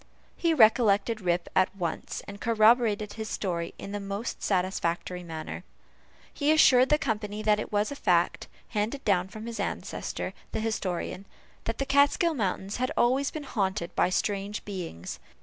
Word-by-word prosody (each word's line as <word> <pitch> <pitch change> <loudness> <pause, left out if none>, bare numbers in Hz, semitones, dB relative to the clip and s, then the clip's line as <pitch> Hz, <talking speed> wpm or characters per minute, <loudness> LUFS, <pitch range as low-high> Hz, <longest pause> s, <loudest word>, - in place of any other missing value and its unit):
He 335 - +1
recollected 220 -3 +4
Rip 175 -1 0
at 185 +1 +3
once, 170 -4 -4
and 200 0 -9
corroborated 220 -2 +3
his 220 -1 -5
story 170 -4 -3
in 200 - -7
the 205 - -3
most 200 +3 -4
satisfactory 180 -2 -1
manner. 165 +1 -6 0.7
He 290 +1 +2
assured 260 -5 +6
the 300 - +5
company 215 -7 -3
that 210 -1 +3
it - - -5
was 210 +4 +1
a - - -4
fact, - - +1 0.2
handed 225 +6 -2
down 185 -3 +2
from 215 +3 -9
his 235 0 -6
ancestor, - - -3 0.2
the - - -1
historian, 195 -3 -3 0.4
that 225 - -2
the 275 - -1
Kaatskill 285 +4 +3
mountains 195 -3 -2
had 255 +1 -1
always 265 +3 +3
been 310 - -6
haunted 190 -8 -2
by - - +3
strange 200 +2 -2
beings. 175 - -6
210 Hz, 160 wpm, -28 LUFS, 190-235 Hz, 0.7 s, assured